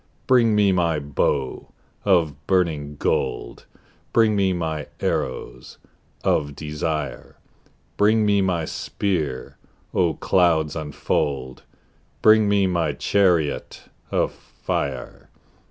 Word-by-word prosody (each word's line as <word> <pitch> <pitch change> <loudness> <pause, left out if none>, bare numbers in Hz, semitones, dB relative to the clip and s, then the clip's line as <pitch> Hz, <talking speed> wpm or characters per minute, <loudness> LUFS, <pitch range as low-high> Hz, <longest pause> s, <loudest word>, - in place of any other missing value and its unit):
Bring 120 -4 +4
me 100 -2 +4
my 85 -3 +1
bow 70 -2 -1 0.4
of 80 -7 +1
burning 80 -6 0
gold: - - -2 0.5
Bring 110 -2 +4
me 95 -2 +2
my 80 -4 -3
arrows - - -3 0.5
of 70 -1 0
desire: 75 0 -4 0.6
Bring 110 +1 +4
me 100 -1 +3
my 90 -4 0
spear: 80 -8 -3 0.4
O 85 -4 +2
clouds 80 -5 +2
unfold! 70 -4 -2 0.6
Bring 110 -1 +6
me 100 -1 +3
my 85 -5 0
chariot 85 -2 0 0.2
of - - +1
fire. - - -5
85 Hz, 100 wpm, -23 LUFS, 75-100 Hz, 0.6 s, Bring